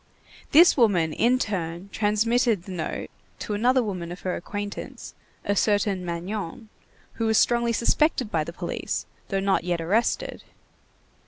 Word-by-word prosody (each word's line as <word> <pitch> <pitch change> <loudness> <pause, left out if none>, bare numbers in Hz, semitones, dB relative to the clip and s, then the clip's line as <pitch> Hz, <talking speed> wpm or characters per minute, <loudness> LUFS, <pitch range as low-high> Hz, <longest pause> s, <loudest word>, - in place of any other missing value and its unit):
This 340 +4 +7
woman 185 - +3
in 245 +2 +3
turn 180 -5 -3
transmitted 220 0 +1
the 190 - -9
note 170 -4 -4 0.3
to 210 - -4
another 250 +5 +3
woman 180 -5 -4
of 180 - -8
her 185 - -2
acquaintance, 205 +3 -6 0.3
a 205 - +1
certain 205 -2 +1
Magnon, 185 +5 -5 0.5
who 225 - +2
was 220 0 +3
strongly 235 -1 +3
suspected 240 0 +1
by 160 -2 +1
the 170 - -7
police, - - -4 0.2
though 195 - 0
not 195 -2 +1
yet 175 -1 -1
arrested. 200 +9 0
205 Hz, 145 wpm, -25 LUFS, 180-230 Hz, 0.5 s, This